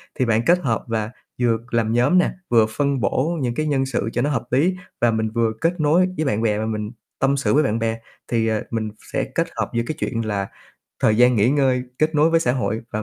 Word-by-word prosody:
thì 130 Hz, -, +1 dB
bạn 115 Hz, -1 st, +2 dB
kết 175 Hz, +1 st, +4 dB
hợp 120 Hz, -8 st, -1 dB
và 110 Hz, -1 st, -2 dB, 0.3 s
vừa 115 Hz, -2 st, +3 dB
làm 115 Hz, -1 st, +1 dB
nhóm 125 Hz, +10 st, +3 dB
nè, 180 Hz, -, +3 dB, 0.2 s
vừa 115 Hz, -2 st, +5 dB
phân 140 Hz, +3 st, 0 dB
bổ 150 Hz, -, 0 dB
những 120 Hz, -2 st, -1 dB
cái 155 Hz, +3 st, -1 dB
nhân 135 Hz, -2 st, +1 dB
sự 120 Hz, -4 st, -2 dB
cho -, -, 0 dB
nó 145 Hz, -, +1 dB
hợp 125 Hz, -6 st, -1 dB
lý 165 Hz, +9 st, +2 dB, 0.3 s
và 120 Hz, -, +4 dB
mình 110 Hz, 0 st, -1 dB
vừa 115 Hz, 0 st, 0 dB
kết 170 Hz, +1 st, 0 dB
nối 165 Hz, +5 st, +3 dB
với 155 Hz, -, 0 dB
bạn 110 Hz, -6 st, 0 dB
bè 105 Hz, -2 st, +1 dB
và 110 Hz, -, -2 dB
mình 105 Hz, -1 st, -3 dB, 0.3 s
tâm 140 Hz, +1 st, +2 dB
sự 140 Hz, -, +1 dB
với 150 Hz, +2 st, +4 dB
bạn 115 Hz, -3 st, 0 dB
bè. 115 Hz, 0 st, -1 dB, 0.3 s
Thì, 115 Hz, -2 st, 0 dB
ờ, 110 Hz, -1 st, 0 dB
mình 110 Hz, -1 st, -2 dB, 0.2 s
sẽ -, -, +1 dB
kết -, -, +1 dB
hợp -, -, -2 dB
giữa 115 Hz, -, 0 dB
cái 155 Hz, -, -3 dB
chuyện 115 Hz, -2 st, -2 dB
là 100 Hz, -2 st, -2 dB, 0.5 s
thời 110 Hz, -1 st, +3 dB
gian 125 Hz, +1 st, +5 dB
nghỉ 110 Hz, +4 st, +3 dB
ngơi, 135 Hz, -3 st, +2 dB, 0.2 s
kết 155 Hz, +1 st, +1 dB
nối 150 Hz, +2 st, +4 dB
với 165 Hz, 0 st, +3 dB
xã 125 Hz, -5 st, +1 dB
hội 120 Hz, -4 st, -1 dB
và 105 Hz, 0 st, -3 dB
120 Hz, 255 wpm, -21 LUFS, 110-145 Hz, 0.5 s, vừa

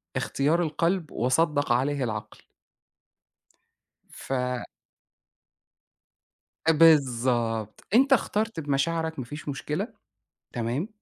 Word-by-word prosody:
اختيار 155 Hz, +5 st, +1 dB
القلب 165 Hz, +1 st, -1 dB
وصدّق 145 Hz, +3 st, +1 dB
عليه 135 Hz, +3 st, +1 dB
العقل. 110 Hz, -3 st, -5 dB, 1.7 s
ف -, -, -10 dB, 2.4 s
آآ 165 Hz, -, +7 dB
بالضبط، 125 Hz, -8 st, +3 dB
أنت 270 Hz, +2 st, +6 dB
اخترت 220 Hz, -5 st, 0 dB
بمشاعرك 160 Hz, +2 st, -1 dB
ما 125 Hz, -, -4 dB
فيش 150 Hz, +4 st, -8 dB
مشكلة، 150 Hz, -, -3 dB, 0.7 s
تمام، 120 Hz, -, -2 dB
145 Hz, 80 wpm, -26 LUFS, 125-165 Hz, 2.4 s, آآ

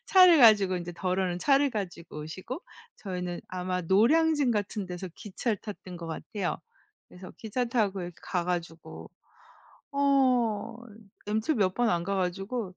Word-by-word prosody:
차를 365 Hz, -3 st, +7 dB
가지고, 205 Hz, -7 st, +6 dB
이제 175 Hz, 0 st, -5 dB
더러는 180 Hz, 0 st, -1 dB
차를 280 Hz, +6 st, +3 dB
가지고 175 Hz, -8 st, -6 dB
오시고 185 Hz, -, -6 dB, 0.4 s
저희는 180 Hz, -3 st, -5 dB
아마 180 Hz, 0 st, -2 dB
노량진 280 Hz, -, +3 dB
같은 205 Hz, -2 st, -2 dB
데서 180 Hz, +1 st, -6 dB
기차를 210 Hz, +2 st, -3 dB
탔던 190 Hz, -4 st, -9 dB
것 170 Hz, -1 st, -7 dB
같아요. 185 Hz, +3 st, -3 dB, 0.5 s
그래서 180 Hz, 0 st, -11 dB
기차 230 Hz, +3 st, -2 dB
타고 205 Hz, -6 st, 0 dB
이렇게 175 Hz, 0 st, -7 dB
가 180 Hz, -2 st, -2 dB
가지고 170 Hz, -2 st, -5 dB, 0.8 s
어 255 Hz, -6 st, +2 dB, 0.5 s
MT 220 Hz, +8 st, 0 dB
몇 190 Hz, -5 st, +1 dB
번 245 Hz, -1 st, +2 dB
안 170 Hz, -1 st, 0 dB
가 195 Hz, -, -1 dB
가지고 195 Hz, +3 st, -3 dB
195 Hz, 295 characters per minute, -28 LUFS, 180-235 Hz, 0.8 s, 차를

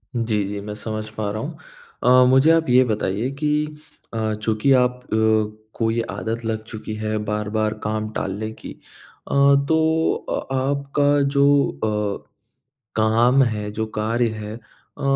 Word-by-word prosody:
जी, 110 Hz, -3 st, 0 dB
जी, 100 Hz, 0 st, -4 dB
मैं 105 Hz, +1 st, -6 dB
समझ 110 Hz, 0 st, -5 dB
पा 110 Hz, -1 st, -4 dB
रहा 110 Hz, -, -4 dB
हूँ। -, -, -6 dB, 0.5 s
अ, 125 Hz, +1 st, +6 dB
मुझे 135 Hz, +5 st, +5 dB
आप 165 Hz, -3 st, +2 dB
ये 125 Hz, +1 st, +6 dB
बताइए 105 Hz, +1 st, -1 dB
कि 150 Hz, 0 st, 0 dB, 0.4 s
अ, 110 Hz, -1 st, -1 dB
चूँकि 110 Hz, +4 st, 0 dB
आप 125 Hz, -1 st, +2 dB
अ, -, -, -26 dB, 0.7 s
को 115 Hz, -1 st, 0 dB
ये 115 Hz, +1 st, 0 dB
आदत 110 Hz, +4 st, -4 dB
लग 110 Hz, -1 st, -2 dB
चुकी 110 Hz, -1 st, -7 dB
है, 110 Hz, 0 st, -2 dB
बार-बार 105 Hz, 0 st, -1 dB
काम 110 Hz, 0 st, -2 dB
टालने 105 Hz, +3 st, -3 dB
की। -, -, -8 dB
अ, -, -, -17 dB, 0.4 s
तो 160 Hz, +1 st, +2 dB, 0.2 s
अ -, -, -1 dB
आपका 140 Hz, +2 st, +1 dB
जो 140 Hz, -, +5 dB, 0.8 s
अ, -, -, -36 dB, 0.7 s
काम 115 Hz, +5 st, +4 dB
है, 105 Hz, -4 st, -1 dB
जो 110 Hz, +1 st, -3 dB
कार्य 115 Hz, +2 st, +1 dB
है 105 Hz, +1 st, -6 dB, 0.4 s
अ, -, -, -7 dB
110 Hz, 155 wpm, -22 LUFS, 110-130 Hz, 0.8 s, अ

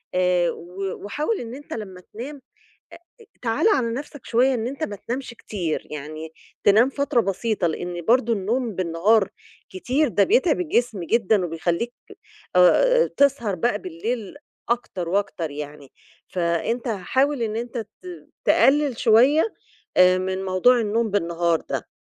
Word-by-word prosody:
آآ 180 Hz, -1 st, +2 dB
و 185 Hz, +3 st, -5 dB
وحاول 300 Hz, -, -2 dB
إن 235 Hz, +1 st, -7 dB
أنت 290 Hz, -, -9 dB
لما 190 Hz, -5 st, -7 dB
تنام 270 Hz, +6 st, -7 dB, 0.8 s
آآ -, -, -15 dB, 0.2 s
تعالَ 230 Hz, -, +1 dB
على 240 Hz, -, +1 dB
نفسك 285 Hz, +1 st, -7 dB
شوية 255 Hz, +3 st, +3 dB
إن 235 Hz, -2 st, -2 dB
أنت 275 Hz, +5 st, -5 dB
ما 210 Hz, -, -3 dB
تنامش 250 Hz, +6 st, -5 dB
كتير، 180 Hz, -8 st, -4 dB
يعني 155 Hz, +2 st, -7 dB, 0.3 s
تنام 220 Hz, +6 st, +5 dB
فترة 280 Hz, -2 st, +1 dB
بسيطة 200 Hz, -1 st, -1 dB
لإن 175 Hz, +2 st, -4 dB
برضو 235 Hz, 0 st, +3 dB
النوم 225 Hz, +2 st, -1 dB
بالنهار 185 Hz, +4 st, +2 dB, 0.4 s
كتير 255 Hz, +11 st, 0 dB
ده 205 Hz, -4 st, +3 dB
بيتعب 370 Hz, -6 st, +3 dB
الجسم 245 Hz, -, 0 dB
جدًا 215 Hz, 0 st, +2 dB
وبيخليك 175 Hz, +8 st, -2 dB, 0.6 s
آآ -, -, +5 dB
تسهر 265 Hz, -8 st, +2 dB
بقى 205 Hz, +4 st, 0 dB
بالليل 200 Hz, +5 st, -4 dB, 0.3 s
أكتر 195 Hz, -7 st, -2 dB
وأكتر 190 Hz, -4 st, -1 dB
يعني. 145 Hz, -1 st, -8 dB, 0.4 s
فأنت 180 Hz, +8 st, -1 dB
حاول 260 Hz, +7 st, 0 dB
إن 220 Hz, -1 st, -1 dB
أنت 240 Hz, +2 st, -4 dB
ت 220 Hz, -2 st, -4 dB, 0.6 s
تقلل 280 Hz, -3 st, +4 dB
شوية 260 Hz, -, +4 dB, 0.4 s
آآ 185 Hz, 0 st, +6 dB
من 190 Hz, +1 st, -2 dB
موضوع 195 Hz, +7 st, +4 dB
النوم 220 Hz, +1 st, 0 dB
بالنهار 170 Hz, -4 st, +1 dB
ده. -, -, -3 dB
220 Hz, 140 wpm, -23 LUFS, 180-250 Hz, 0.8 s, آآ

